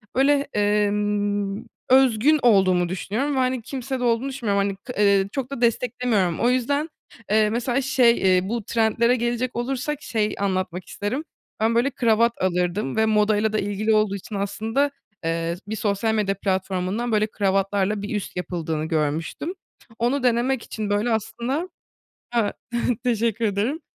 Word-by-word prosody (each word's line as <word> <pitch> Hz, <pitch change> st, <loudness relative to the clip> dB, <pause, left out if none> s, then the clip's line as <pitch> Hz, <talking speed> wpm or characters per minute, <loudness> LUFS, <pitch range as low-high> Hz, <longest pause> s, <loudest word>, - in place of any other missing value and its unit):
böyle, 275 Hz, +3 st, +4 dB, 0.2 s
emm, 205 Hz, -1 st, 0 dB, 0.3 s
özgün 260 Hz, +3 st, +5 dB
olduğumu 185 Hz, -6 st, +4 dB
düşünüyorum 225 Hz, +10 st, -2 dB
ve, -, -, +1 dB
hani, 255 Hz, -1 st, 0 dB
kimsede 260 Hz, +1 st, -4 dB
olduğunu 240 Hz, +2 st, +1 dB
düşünmüyorum. 220 Hz, -7 st, 0 dB
Hani, 200 Hz, -, -3 dB
k 225 Hz, +6 st, -9 dB
ııı, 200 Hz, -2 st, +4 dB
çok 270 Hz, 0 st, -4 dB
da 275 Hz, -, -5 dB
desteklemiyorum. 235 Hz, -6 st, +1 dB
O 240 Hz, -, +3 dB
yüzden, 280 Hz, +5 st, 0 dB, 0.4 s
eee, 215 Hz, 0 st, +4 dB
mesela, 240 Hz, +4 st, 0 dB
şey, 255 Hz, -3 st, +4 dB
eee, 185 Hz, 0 st, +2 dB
bu 235 Hz, 0 st, -2 dB
trendlere 230 Hz, +2 st, +2 dB
gelecek 240 Hz, +1 st, -1 dB
olursak 270 Hz, +4 st, -2 dB
şey 215 Hz, -2 st, -1 dB
anlatmak 185 Hz, -2 st, -2 dB
isterim, 220 Hz, +12 st, -3 dB, 0.4 s
ben, 225 Hz, +1 st, +2 dB
böyle, 245 Hz, +4 st, +2 dB
kravat 235 Hz, -2 st, +2 dB
alırdım 180 Hz, -3 st, 0 dB
ve 220 Hz, -, +3 dB
modayla 215 Hz, 0 st, +2 dB
da 215 Hz, -, +1 dB
ilgili 205 Hz, +2 st, 0 dB
olduğu 215 Hz, -2 st, +2 dB
için, 210 Hz, +2 st, -7 dB
aslında, 220 Hz, +8 st, 0 dB, 0.3 s
eee, 165 Hz, +1 st, -1 dB
bir 215 Hz, -, -3 dB
sosyal 215 Hz, +1 st, 0 dB
medya 205 Hz, -2 st, 0 dB
platformundan, 190 Hz, +4 st, -1 dB
böyle, 215 Hz, 0 st, +2 dB
kravatlarla 195 Hz, 0 st, 0 dB
bir 205 Hz, +1 st, -4 dB
üst 205 Hz, -, -4 dB
yapıldığını 165 Hz, -3 st, -3 dB
görmüştüm. 160 Hz, -, -2 dB, 0.5 s
Onu 250 Hz, +3 st, +1 dB
denemek 245 Hz, +1 st, +1 dB
için, 215 Hz, -2 st, -5 dB
böyle, 205 Hz, +4 st, +1 dB
aslında 235 Hz, -, -2 dB, 0.7 s
Ha, 225 Hz, -4 st, +2 dB, 0.5 s
teşekkür 230 Hz, -1 st, 0 dB
ederim. 220 Hz, +9 st, 0 dB
220 Hz, 150 wpm, -23 LUFS, 200-245 Hz, 0.7 s, özgün